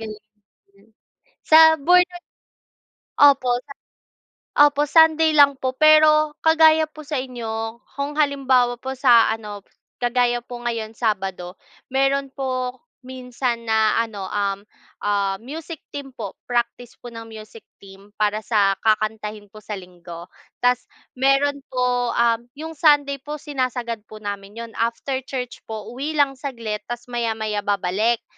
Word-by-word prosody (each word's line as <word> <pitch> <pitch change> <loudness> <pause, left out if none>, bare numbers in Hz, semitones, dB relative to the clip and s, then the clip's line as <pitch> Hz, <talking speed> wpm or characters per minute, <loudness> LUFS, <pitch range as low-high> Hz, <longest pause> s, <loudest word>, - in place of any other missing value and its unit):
Galing 215 -1 -8 0.5
namn. 200 +2 -25 0.6
Sa 315 - +7 0.2
Born-Again 360 +3 +3 1.0
Opo 280 -3 +5
Sun 280 +3 -13 0.8
opo 290 0 +5
Sunday 320 +1 +5
lang 285 -2 +6
po, 260 -1 -2
pero 310 0 +5
kagaya 320 0 +5
po 310 0 -14
sa 295 0 -4
inyo 230 -2 -5 0.2
kung 285 +1 -2
halimbawa 265 -5 +2
po 265 +1 -5
sa 240 -4 +4
ano 210 -2 -7 0.3
kagaya 245 0 0
po 240 0 -9
ngayon 230 -2 -4
Sabado, 195 -5 -3 0.3
meron 275 +1 +1
po 255 -1 -3 0.3
minsan 250 -2 -4
na 220 0 +3
ano, 215 -4 -4
um, 200 -1 -2 0.4
ah, 200 -1 0
music 310 - -8 0.2
team 285 -1 -6
po. 205 -4 -7
Practice 240 0 -2
po 240 -1 -11
ng 225 0 -9
Practice 215 0 -13 0.4
para 210 0 0
sa 205 -3 +2
kakantahin 215 -1 -1
po 215 - -12
sa 210 -1 -6
Linggo. 175 -2 -11 0.4
Tapos 250 0 +2 0.2
meron 275 +2 +1
po 250 -1 0 0.4
yung 320 +2 -7
Sunday 290 -3 +2
po 295 +2 -6
sinasagad 255 -5 -3
po 215 -1 -12
namin 200 +1 -6
'yon. 230 0 -7
After 235 +4 -2
church 255 -2 -6
po, 220 +1 -7
uwi 290 +5 -4
lang 285 -2 +3
saglit 235 -6 -5
tapos 240 0 -6
maya-maya 220 -3 -2
babalik 205 +3 0
245 Hz, 135 wpm, -22 LUFS, 215-280 Hz, 1.0 s, Sa